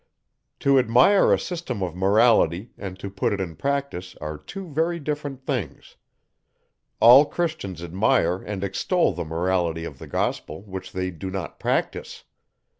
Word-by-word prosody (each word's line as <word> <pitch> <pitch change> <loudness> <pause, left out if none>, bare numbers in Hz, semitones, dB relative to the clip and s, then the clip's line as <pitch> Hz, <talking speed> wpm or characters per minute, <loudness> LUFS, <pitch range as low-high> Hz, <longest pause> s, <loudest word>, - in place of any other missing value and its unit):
To 140 -1 +5
admire 125 - +5
a - - +5
system 160 - -4
of 90 -2 -4
Morality, 100 0 +3
and 95 -2 -7
to 95 - -6
put 100 +1 -1
it 100 - -3
in 85 -4 -4
practice, 140 - -3
are 75 0 -5
two 180 - -9
very 165 +3 -1
different 145 -3 -5
things. 130 -8 -4 1.0
All 120 +5 +9
Christians 150 - -3
admire 90 +1 +2
and 100 -2 -5
extol 100 - +1
the 85 +1 -4
Morality 85 0 -1
of 70 -5 -9
the - - -9
gospel; 80 +5 -3
which 95 -2 -8
they 95 0 -3
do 95 +3 -6
not 95 -1 -6
practise. - - -2
100 Hz, 150 wpm, -24 LUFS, 90-140 Hz, 1.0 s, All